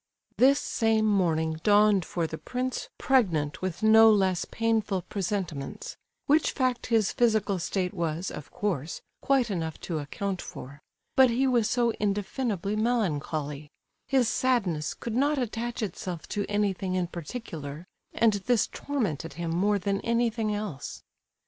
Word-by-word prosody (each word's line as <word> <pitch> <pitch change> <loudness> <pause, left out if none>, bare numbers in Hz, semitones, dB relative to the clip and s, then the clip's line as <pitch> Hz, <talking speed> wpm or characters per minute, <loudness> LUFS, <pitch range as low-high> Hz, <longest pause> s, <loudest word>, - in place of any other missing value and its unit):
This 275 +3 +5
same 225 -1 +1
morning 160 -6 +1
dawned 205 -2 +4
for 170 -2 -2
the 160 0 -5
prince 255 +1 -3
pregnant 170 - +1
with 185 +1 -4
no 220 +1 +8
less 190 -4 +2
painful 220 -5 0
presentiments,—which 195 - -2
fact 255 -3 0
his 225 -3 +2
physical 215 -5 +2
state 180 +1 -2
was, 170 -1 -2
of 150 - -8
course, 170 -7 -3 0.2
quite 260 -5 +2
enough 160 -4 -3
to 165 -3 -3
account 185 +6 -4
for; 140 +3 -9 0.3
but 260 -1 +7
he 245 +3 +1
was 240 -4 +2
so 240 -1 +2
indefinably 205 0 -1
melancholy,—his 160 - -1
sadness 200 -12 0
could 230 - -5
not 285 +4 +2
attach 240 -1 -3
itself 180 -3 -5
to 205 -1 -2
anything 195 -3 0
in 180 -1 +1
particular, 165 - -7 0.3
and 225 -1 +3
this 245 -3 +3
tormented 185 - -3
him 165 +2 -4
more 200 +5 +2
than 195 +1 -1
anything 230 -2 0
else. 205 -9 -5
205 Hz, 135 wpm, -27 LUFS, 170-230 Hz, 0.3 s, no